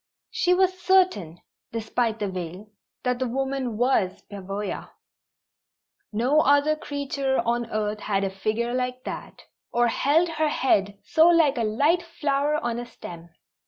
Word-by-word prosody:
She 360 0 +2
was 370 0 +2
certain, 355 - +2 0.3
despite 225 0 -1
the 210 - -2
veil, 185 +2 -6 0.3
that 250 -1 0
the 260 - 0
woman 265 -2 -2
was 240 -6 +1
Pavoya. 200 +1 -5 1.2
No 250 +8 +2
other 285 +2 +4
creature 280 -2 -2
on 235 0 0
earth 210 -1 -2
had 200 -2 -1
a 195 - -1
figure 220 +5 -2
like 250 0 -2
that, - - -7 0.3
or 240 0 +3
held 310 +8 +2
her 315 -2 0
head 205 -8 +1
so 320 +1 +4
like 320 -6 +4
a - - +1
light 285 +11 +2
flower 295 -3 -1
on 240 -5 -2
a 240 - -5
stem. 170 -6 -10
245 Hz, 145 wpm, -25 LUFS, 210-290 Hz, 1.2 s, other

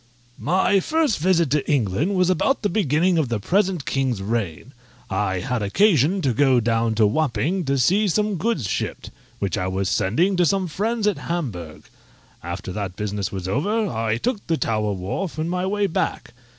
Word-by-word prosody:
_ - - -11
My 190 +2 +3
first 305 - +1
visit 170 -3 +2
to 150 +1 +1
England 140 - +1
was 185 0 +3
about 230 +10 +1
the 205 - +2
beginning 170 -1 +2
of 145 -6 0
the 115 -3 -1
present 185 - 0
king's 130 -5 -1
reign. 105 - -3 0.4
I 95 -1 0
had 125 -3 -2
occasion 170 - +3
to 130 - +2
go 130 0 +4
down 115 -1 +1
to 110 -1 +4
Wapping, 155 - 0
to 140 0 +1
see 195 - +3
some 210 +1 0
goods 165 - -1
shipped, - - -4 0.3
which 100 -4 -2
I 90 - -1
was 95 0 -1
sending 160 - +1
to 175 - +4
some 195 0 +1
friends 215 +6 -1
at 210 -2 +1
Hamburgh; 100 - -4 0.6
after - - -5
that 95 -2 -4
business 105 -1 -3
was 95 -2 -5
over, 205 - 0
I 110 0 -1
took 230 - -3
the 165 - +1
Tower 110 -4 0
Wharf 100 - -4
in 155 +1 -1
my 180 +1 -1
way 205 +1 +1
back. 175 - -2
145 Hz, 185 wpm, -22 LUFS, -, 0.6 s, go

